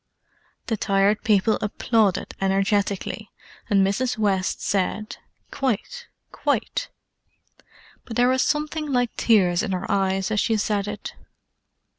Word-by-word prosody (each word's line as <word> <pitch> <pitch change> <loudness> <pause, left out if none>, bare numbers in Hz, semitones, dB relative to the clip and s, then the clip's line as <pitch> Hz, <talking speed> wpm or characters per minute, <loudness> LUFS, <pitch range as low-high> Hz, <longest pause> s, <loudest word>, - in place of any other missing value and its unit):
The 225 - -1
Tired 200 +1 +2
People 210 0 +3
applauded 210 -1 +1
energetically, 195 0 0 0.4
and 195 -2 +4
Mrs. 225 +6 0
West 200 -3 0
said 205 +2 -2 0.3
"Quite—quite!" 375 - -3 1.2
But 225 - -7
there 245 +2 +4
was 260 0 +2
something 300 0 -1
like 245 -2 0
tears 185 -6 +3
in 215 -4 -2
her 180 - -2
eyes 195 0 0
as 215 - +1
she 225 +2 +1
said 205 -1 -1
it. 210 -1 -6
210 Hz, 115 wpm, -23 LUFS, 195-235 Hz, 1.2 s, and